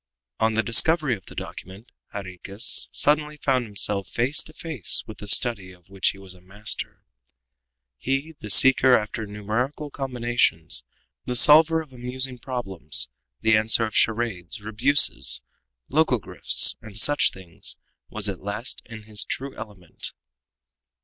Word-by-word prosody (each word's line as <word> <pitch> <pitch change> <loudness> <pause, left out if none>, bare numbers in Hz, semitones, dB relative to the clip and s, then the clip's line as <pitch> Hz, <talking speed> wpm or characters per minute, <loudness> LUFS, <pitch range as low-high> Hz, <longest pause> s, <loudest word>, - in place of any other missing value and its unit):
On 110 0 +1
the 110 - +1
discovery 150 +3 +3
of 95 - -16
the - - -12
document, 100 +7 -9 0.2
Jarriquez 100 +2 0
suddenly 150 0 +2
found 130 -4 0
himself 100 -2 -2
face 125 +5 +1
to - - -11
face 155 - -1
with - - -11
the 105 - -9
study 100 -2 +2
of 90 +1 -23
which 95 -1 -1
he - - -7
was 95 -1 -12
a 90 - -19
master. 100 +4 -5 1.0
He, 135 +5 -2
the 105 - -8
seeker 130 +3 +6
after 110 0 -5
numerical 110 +9 -4
combinations, 120 - 0 0.4
the 125 - -3
solver 160 +5 +6
of 140 -4 -20
amusing 125 +1 -4
problems, 100 - -2 0.3
the 110 0 +4
answerer 110 +1 +3
of 110 - -7
charades, 110 -6 0
rebuses, 115 +7 +1 0.5
logogryphs, 135 - +3
and 110 -2 -12
such 145 +7 +4
things, 95 -3 -6 0.3
was 105 -1 -1
at 95 -3 -5
last 105 +5 -3
in 110 -2 -10
his 105 -1 -2
true 135 +1 -6
element. 100 -6 -8
110 Hz, 140 wpm, -24 LUFS, 100-130 Hz, 1.0 s, seeker